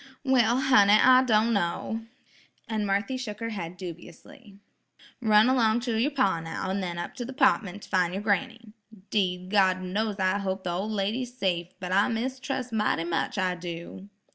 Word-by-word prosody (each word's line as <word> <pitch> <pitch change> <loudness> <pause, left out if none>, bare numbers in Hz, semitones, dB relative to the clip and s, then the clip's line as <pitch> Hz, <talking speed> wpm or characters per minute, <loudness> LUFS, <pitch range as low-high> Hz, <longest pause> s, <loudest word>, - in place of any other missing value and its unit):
"Well, 250 -3 +3
honey, 210 -7 +5
I 255 +4 +7
don' 230 -1 +2
kno'," 210 +4 -2 0.6
and 215 -3 -2
Marthy 200 +7 -1
shook 215 -5 -6
her 230 0 -3
head 180 -4 -6
dubiously. 195 - -11 0.6
Run 215 0 +5
along 240 -3 +2
to 235 -2 -2
yer 235 +6 +2
pa 200 - +1
now, 165 +3 -4
an' 195 - -1
then 175 -2 -4
up 175 - -5
to 245 - -3
the 260 +3 -7
'partment 220 -8 +1
to - - -12
fin' 180 -3 +1
yer 195 - -2
granny. 225 +1 -2 0.4
'Deed, 185 -3 -1
God 190 -3 +3
knows 205 +3 -2
I 190 +1 +1
hope 190 -1 -3
the 180 - -2
ol' 190 +5 -3
lady's 220 +5 -2
safe, 175 -6 -1
but 180 -1 -5
I 200 +2 +3
mistrus' 255 +1 -3
mighty 210 -6 0
much, 170 +4 -2
I 185 -2 +1
do." 175 +2 -8
210 Hz, 180 wpm, -27 LUFS, 185-235 Hz, 0.6 s, I